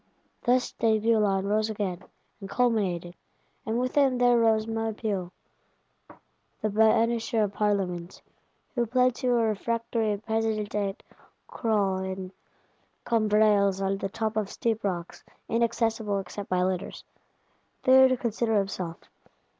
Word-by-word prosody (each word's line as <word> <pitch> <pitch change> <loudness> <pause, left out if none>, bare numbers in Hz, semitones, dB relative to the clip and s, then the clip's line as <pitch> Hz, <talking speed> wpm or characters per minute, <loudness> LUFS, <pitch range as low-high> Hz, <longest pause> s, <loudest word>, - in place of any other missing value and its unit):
Thus 250 +1 +2
D'Aiguillon 215 -3 +2
rose 215 +2 +1
again, 195 -4 -3 0.4
and 195 -2 -8
culminated. 195 -9 0 0.5
And 225 +2 0
with 255 0 -1
him 275 -3 +3
there 245 0 +4
rose 225 -2 +3
Maupeou, 220 -4 -3 1.3
the 215 - -1
banisher 225 +1 +2
of 205 -1 -2
Parlements; 190 -4 -2 0.5
who 240 -3 0
plants 250 +1 +2
you 250 -1 +2
a 230 - +2
refractory 225 0 -1
President 220 -1 -2
"at 200 -1 -2 0.4
Croe 205 -5 0
in 190 0 -5 0.7
Combrailles 210 -3 +3
on 195 0 -1
the 195 - -3
top 220 +1 -3
of 210 -2 -1
steep 225 0 -2
rocks, 175 -4 -4 0.2
inaccessible 225 -2 0
except 195 +1 -6
by 180 0 +1
litters," 185 0 -3 0.8
there 265 0 +7
to 255 0 +1
consider 230 -1 0
himself. 185 -4 -3
215 Hz, 125 wpm, -27 LUFS, 195-230 Hz, 1.3 s, there